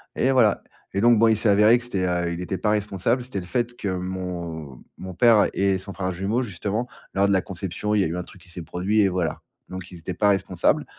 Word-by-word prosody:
et 130 - +2
voilà. 115 -5 +3 0.3
Et 100 - 0
donc, 120 0 +5
bon, 115 - +5
il 110 -1 +3
s'est 110 - 0
avéré 105 +4 +6
que 120 - -7
c'était, 95 -6 -1
heu, 85 -1 -1
il 85 - -5
était 95 +1 -3
pas 105 - 0
responsable, 105 +4 0
c'était 120 -6 -5
le 90 - -8
fait 120 +6 -2
que 100 - -4
mon 90 -6 -5
mon 95 0 -7
père 110 0 +5
et 95 -1 +1
son 95 +1 -9
frère 95 -1 -2
jumeau 100 +7 -1
justement, 105 +2 -3 0.3
lors 100 +1 +3
de 100 - +2
la 95 - +3
conception, 95 +3 -4
il 105 - +3
y - - +3
a - - 0
eu 85 +2 -4
un 90 - -3
truc 90 - -16
qui 90 - -19
s'est 85 -1 -8
produit 100 +6 0
et 100 - +4
voilà. 90 -3 -2 0.3
Donc 95 0 -7
ils 85 - -10
étaient 90 +2 -5
pas 105 +1 +3
responsables, 95 -2 +1
95 Hz, 255 wpm, -24 LUFS, 90-105 Hz, 0.3 s, avéré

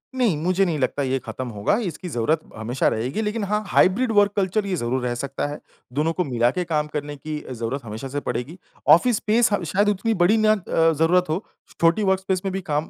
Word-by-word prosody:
नहीं, 240 -9 +2
मुझे 185 +2 +2
नहीं 165 -4 -1
लगता 140 +1 0
ये 135 0 0
खत्म 130 +1 -6
होगा, 105 - 0
इसकी 180 -5 -4
ज़रूरत 150 +3 +1 0.2
हमेशा 115 +4 -1
रहेगी 125 - -1
लेकिन 215 0 -2
हाँ, 210 +2 -1
हाइब्रिड 220 +7 +3
वर्क 205 -1 +4
कल्चर 200 +1 0
ये 195 -2 -1
ज़रूर 130 -3 -1
रह 120 -1 -1
सकता 140 +3 -3
है। 145 +1 -6 0.3
दोनों 155 +4 0
को 180 - 0
मिला 120 -3 +1
के 180 - -2
काम 150 -3 0
करने 145 0 -4
की 155 +2 -5
ज़रूरत 125 +3 -4
हमेशा 110 +4 -6
से 140 +2 -3
पड़ेगी। 125 +8 -4 0.3
ऑफ़िस 175 +11 +6
स्पेस 220 +3 +2
ह 200 - 0
शायद 205 +1 +4
उतनी 210 +3 0
बड़ी 185 +3 +3
ना 215 0 +4
अ, 165 -5 +1
ज़रूरत 165 +4 +3
हो, 170 +7 -1 0.4
छोटी 170 +5 +3
वर्कस्पेस 190 -1 +1
में 195 - 0
भी 195 - -2
काम 150 -1 -2
165 Hz, 220 wpm, -23 LUFS, 140-200 Hz, 0.4 s, ऑफ़िस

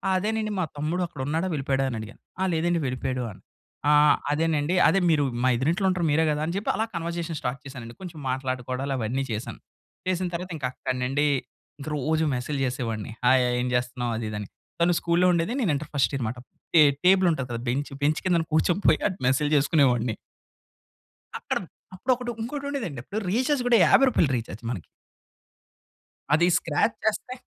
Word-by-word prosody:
"అదేనండి 215 +3 -1
మా - - +2
తమ్ముడు 155 +5 -1
అక్కడున్నాడా 155 +3 -2
వెళ్ళిపోయాడా?" 135 -2 0
అని 120 - -4
అడిగా. 110 +1 -8 0.3
"ఆ! - - +3
లేదండి 170 +1 +1
వెళ్ళిపోయాడు." 130 0 -2
అన్నా 95 - -15 0.5
"ఆ! - - +6 0.4
అదేనండి 160 +1 +1
అదే 195 - +4
మీరు 150 -3 +3 0.2
మా - - +5
ఎద్దరింట్లో 170 - +1
ఉంటారు 185 -2 0
మీరే 160 +2 +3
గదా!" 150 0 -1
అని 170 - -2
జెప్పి 205 - 0
అలా 220 - 0
కన్వర్జేషన్ 170 -1 -3
స్టార్ట్ 125 +1 -3
చేశానండి. 120 -4 -9
కొంచెం 175 -4 -8
మాట్లాడుకోవడాలు 130 +1 -2
అవన్నీ 125 +3 -1
చేశాను. 110 +1 -5 0.5
చేసిన 185 0 0
తర్వాత 180 +2 -5
ఇంక 140 - -4
అక్కడ్నుండి 130 +3 -1 0.5
ఇంక 140 - -8
రోజు 155 +3 +1
మెసేజ్‌లు 135 +3 -3
చేసేవాడిని. 120 -4 -3
"హాయ్ 130 +1 +6
హాయ్ 125 0 0
ఏం 125 - -1
జెస్తున్నావు?" 125 -1 -1
అది 110 -1 -3
ఇది 105 - -4
అని. 105 - -6 0.3
తను 175 +1 +4
స్కూల్‌లో 170 +2 +2
ఉండేది 170 +6 0
నేను 200 -9 +2
ఇంటర్ 150 +2 -5
ఫస్ట్ 140 - +2
ఇయర్ 135 - -2
అన్నమాట. 115 +2 -3 0.4
టే 160 - +9 0.2
టేబుల్ 190 0 +6
ఉంటది 135 -6 -2
గదా! 115 - -3
బెంచ్, 140 +4 -2
బెంచ్ 155 +2 +2
కింద 180 -2 +3
కూర్చొ 160 +3 +3
పోయి - - +5 0.3
మెసేజ్‌లు 145 +3 +2
చేసుకునేవాడిని. 125 -6 +2 1.2
అక్కడ - - -2 0.4
అప్పుడు 245 +8 -1
ఒకటి 245 0 -5
ఇంకోటి 280 +4 -5
ఉండేది 280 -4 -3
అండి 135 -5 -7
అప్పుడు 205 +9 -4
రీచార్జ్ 260 +5 +1
కూడా 240 -1 +6
50 270 - +6
రూపాయలు 165 - +2
రీచార్జ్ 115 -2 -7
మనకీ. 95 -9 -5 1.5
అది 170 +3 +4
స్క్రాచ్ 165 +8 0
చేస్తే. 220 +3 -1
150 Hz, 175 wpm, -26 LUFS, 130-175 Hz, 1.5 s, టే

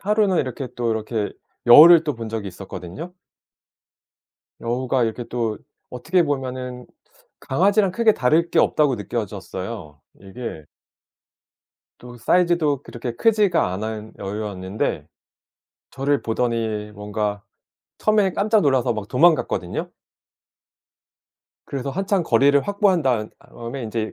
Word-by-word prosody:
하루는 205 -3 +2
이렇게 130 0 -3
또 120 -1 -1
이렇게 110 -1 -2 0.3
여우를 160 +7 +9
또 150 - -1
본 115 -1 -6
적이 110 -3 -4
있었거든요. 95 - -8 1.5
여우가 125 +1 0
이렇게 115 +2 -3
또 115 -3 -3 0.3
어떻게 170 +8 +1
보면은 130 -3 -4 0.5
강아지랑 195 +7 +2
크게 225 +1 +4
다를 155 +7 +2
게 - - +1
없다고 145 -4 +3
느껴졌어요. 100 - -6 0.2
이게 95 - -8 1.3
또 120 0 -12
사이즈도 170 -2 +2
그렇게 120 -2 -6
크지가 205 - +2
않은 110 +2 -5
여우였는데 100 -1 -4 0.9
저를 140 +1 0
보더니 110 -2 -2
뭔가 105 0 -3 0.6
처음에는 210 -3 +2
깜짝 210 +1 +2
놀라서 130 -4 +2
막 105 -2 -5
도망갔거든요. 160 +5 +1 1.8
그래서 140 0 -4
한참 195 +2 0
거리를 140 +2 +4
확보한 200 -4 +2
다은 120 -5 0
다음에 120 +3 -8
인제 110 -1 -3
125 Hz, 280 characters per minute, -22 LUFS, 110-165 Hz, 1.8 s, 여우를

